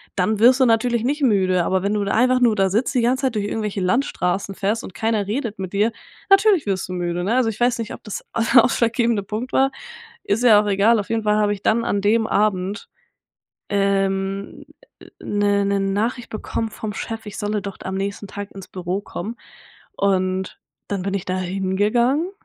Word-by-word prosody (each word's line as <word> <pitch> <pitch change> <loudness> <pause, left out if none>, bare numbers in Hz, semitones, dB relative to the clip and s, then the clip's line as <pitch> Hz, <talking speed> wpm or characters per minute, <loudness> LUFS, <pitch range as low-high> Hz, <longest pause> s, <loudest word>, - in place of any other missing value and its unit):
dann 205 +3 +1
wirst 250 +4 +6
du 260 - +5
natürlich 230 0 +2
nicht 285 +3 -1
müde. 185 -6 +3
Aber 190 0 +1
wenn 200 +2 0
du 205 - 0
da 200 - -1
einfach 255 +2 +3
nur 235 -3 +4
da 195 -2 +2
sitzt 225 +9 0
die 250 - +2
ganze 255 +3 +1
Zeit 255 -4 0
durch 205 -1 -1
irgendwelche 210 -2 -3
Landstraßen 190 -2 0
fährst 205 +4 -1
und - - -9
keiner 220 -1 0
redet 220 0 -3
mit 190 0 -6
dir, 210 +3 +2 0.4
natürlich 390 - +4
wirst 190 -2 -1
du - - -4
müde, 175 0 -2
ne? 220 +6 0
Also 250 -3 +2
ich 215 - -6
weiß 240 0 +2
nicht, 230 +1 -4
ob - - -17
das 210 - -6 0.3
der 245 -3 +8
ausschlaggebende 230 -3 +1
Punkt 220 +5 -5
war. 270 0 +3 0.5
Ist 210 +4 0
ja 215 -4 +7
auch 210 - -4
egal. 205 +3 +3
Auf 205 - -5
jeden 225 -1 -1
Fall 210 0 +2
habe 210 -1 +2
ich 200 -1 -9
dann 230 +1 +2
an 200 - 0
dem 220 +2 +2
Abend, 200 -1 0 0.8
ähm, 195 0 -1 0.6
'ne 205 -1 +1
'ne 200 0 +1
Nachricht 215 +5 -1
bekommen 225 +1 -3
vom 215 0 -6
Chef, 225 -1 -6
„ich 205 - -8
solle 210 0 -1
doch 200 -1 -7
am 190 - -4
nächsten 200 +1 -4
Tag 205 0 -7
ins 195 -2 -10
Büro 185 +1 -3
kommen“. 210 +3 -6 0.6
Und 190 - -1 0.3
dann 200 -2 -2
bin 195 +1 -3
ich 195 - -2
da 185 0 -2
hingegangen 205 - 0
205 Hz, 205 wpm, -21 LUFS, 195-230 Hz, 0.8 s, der